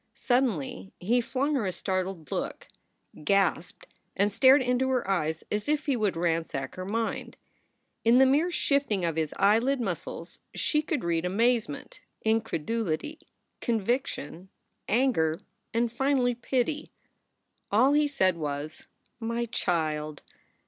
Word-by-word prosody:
Suddenly 210 - 0
he 235 +7 +2
flung 275 +5 -1
her 240 -8 0
a - - 0
startled 185 -4 -3
look, - - -3 0.6
gasped, 195 -1 +1 0.3
and 200 +1 +2
stared 265 +3 +6
into 250 +1 +1
her 255 -5 0
eyes 160 -4 0
as 210 +6 -1
if 300 0 +1
he 280 -3 +1
would 210 -7 0
ransack 165 -5 -1
her 185 - -6
mind. 225 +3 -3 0.7
In 230 +2 +5
the 265 - +7
mere 290 +7 +3
shifting 280 - +1
of 165 -2 -1
his 160 -2 -1
eyelid 230 +7 +3
muscles 235 - -5 0.2
she 300 - +1
could 310 -3 -2
read 170 -1 0
amazement, 220 -3 0 0.2
incredulity, 225 - -1 0.4
conviction, 215 - -2 0.4
anger, 200 -10 +2 0.3
and 230 0 +1
finally 265 -1 +2
pity. 255 +5 -1 0.8
All 250 +7 +5
he 300 0 +4
said 190 -11 +2
was, 150 0 -5 0.3
"My 230 +1 -1
child!" 155 -8 -2
225 Hz, 130 wpm, -28 LUFS, 170-260 Hz, 0.8 s, the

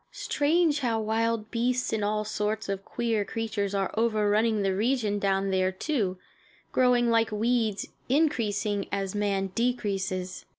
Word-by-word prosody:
Strange 305 0 +1
how 235 -5 0
wild 220 0 -1
beasts 245 +1 0
and 215 -2 0
all 210 +1 0
sorts 215 0 -2
of 195 0 -3
queer 225 -2 -1
creatures 205 -2 -3
are 195 -1 0
overrunning 215 -1 +2
the 195 -1 +1
region 215 -1 +1
down 195 0 +1
there, 185 0 +2
too, 190 -3 -1 0.5
growing 245 -2 +3
like 230 -1 +2
weeds, 220 -1 0 0.2
increasing 220 -8 +1
as 195 -1 -2
man 200 -2 -1
decreases. 195 -6 -2
215 Hz, 135 wpm, -27 LUFS, 200-235 Hz, 0.5 s, growing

